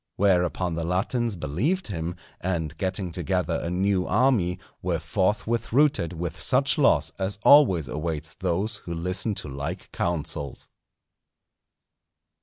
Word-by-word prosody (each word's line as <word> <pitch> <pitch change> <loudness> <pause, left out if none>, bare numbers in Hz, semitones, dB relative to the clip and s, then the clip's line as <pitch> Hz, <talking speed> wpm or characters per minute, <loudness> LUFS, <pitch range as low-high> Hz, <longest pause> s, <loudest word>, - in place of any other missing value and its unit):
Whereupon 90 -2 +2
the 85 0 -2
Latins 100 +6 0
believed 100 - -1
him, 85 -2 -3 0.2
and 85 -4 -2
getting 95 -1 -2
together 90 0 -1
a 85 - -3
new 95 +1 +1
army, 105 -9 +2 0.2
were 90 -2 0
forthwith 105 +7 -1
routed 135 - +3
with 85 0 -5
such 135 +2 +2
loss 140 - +4
as 95 +2 -2
always 95 - +6
awaits 75 +3 -3
those 95 +6 -1
who 85 - -6
listen 90 +5 -1
to - - -4
like 70 +1 -5
counsels. 75 -4 -3
90 Hz, 125 wpm, -26 LUFS, 85-105 Hz, 0.2 s, always